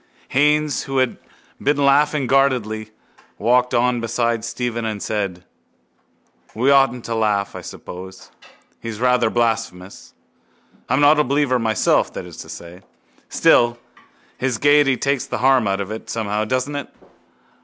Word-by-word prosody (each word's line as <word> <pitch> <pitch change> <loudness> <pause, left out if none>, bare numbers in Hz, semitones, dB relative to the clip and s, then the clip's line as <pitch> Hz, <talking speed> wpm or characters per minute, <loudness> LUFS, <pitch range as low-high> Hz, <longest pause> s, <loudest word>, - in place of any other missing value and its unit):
Haines, 150 +1 +1
who 135 0 -3
had 130 -2 0 0.4
been 145 +1 +1
laughing 145 0 +3
guardedly, 120 -5 +1 0.5
walked 125 +3 +2
on 120 0 +1
beside 115 0 -1
Stephen 120 0 -3
and 110 -2 -3
said: 100 -4 -3 1.1
—We 125 +5 +2
oughtn't 135 -3 +3
to 115 - -3
laugh, 105 -3 0
I - - -6
suppose. 95 +1 -10 0.5
He's 115 -2 -6
rather 125 -2 +2
blasphemous. 115 -5 -3 0.7
I'm 130 +2 +2
not 150 +1 +5
a - - +4
believer 140 -2 +1
myself, 110 -3 +1
that - - -6
is - - -12
to - - -10
say. 85 +2 -10 0.5
Still 120 0 +3 0.6
his 130 -3 -1
gaiety 145 0 +4
takes 140 -1 -1
the - - -3
harm 130 -3 +3
out 95 0 0
of 100 +1 -4
it 110 - -7
somehow, 110 -1 -2
doesn't 130 +5 -2
it? 145 - -5
120 Hz, 145 wpm, -20 LUFS, 110-135 Hz, 1.1 s, not